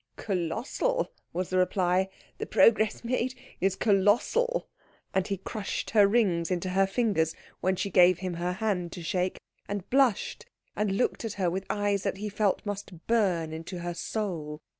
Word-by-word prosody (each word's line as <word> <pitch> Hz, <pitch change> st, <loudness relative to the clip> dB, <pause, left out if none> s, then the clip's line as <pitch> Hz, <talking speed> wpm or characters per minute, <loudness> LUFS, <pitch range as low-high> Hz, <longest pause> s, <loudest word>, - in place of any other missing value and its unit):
"Colossal," 225 Hz, -, -1 dB, 0.2 s
was 180 Hz, +1 st, -3 dB
the 185 Hz, -, +3 dB
reply, 185 Hz, 0 st, +2 dB, 0.3 s
"the -, -, -3 dB
progress 220 Hz, -1 st, +4 dB
made 255 Hz, +1 st, -1 dB, 0.2 s
is 195 Hz, +1 st, +1 dB
colossal." 230 Hz, -, +2 dB, 0.5 s
And 190 Hz, -1 st, +1 dB
he 195 Hz, -, -1 dB
crushed 195 Hz, +2 st, -4 dB
her 205 Hz, -3 st, +6 dB
rings 195 Hz, -7 st, +2 dB
into 180 Hz, 0 st, -1 dB
her 195 Hz, +1 st, +3 dB
fingers 195 Hz, -6 st, +1 dB, 0.2 s
when 185 Hz, +1 st, +1 dB
she 195 Hz, +2 st, -2 dB
gave 180 Hz, 0 st, +6 dB
him 185 Hz, -1 st, -4 dB
her 175 Hz, +1 st, -2 dB
hand 185 Hz, -4 st, -1 dB
to 175 Hz, -, -7 dB
shake, 180 Hz, +1 st, -1 dB, 0.3 s
and 200 Hz, -2 st, -4 dB
blushed, 270 Hz, -, +2 dB, 0.3 s
and 205 Hz, -2 st, 0 dB
looked 245 Hz, -, 0 dB
at 225 Hz, -3 st, -3 dB
her 185 Hz, -4 st, 0 dB
with 190 Hz, +2 st, -4 dB
eyes 205 Hz, -1 st, +1 dB
that 190 Hz, -, -2 dB
he 210 Hz, +1 st, -4 dB
felt 205 Hz, 0 st, 0 dB
must 200 Hz, -4 st, -6 dB
burn 185 Hz, -9 st, +1 dB
into 165 Hz, +3 st, -6 dB
her 175 Hz, 0 st, -3 dB
soul. 170 Hz, -6 st, -4 dB
195 Hz, 165 wpm, -28 LUFS, 180-215 Hz, 0.5 s, her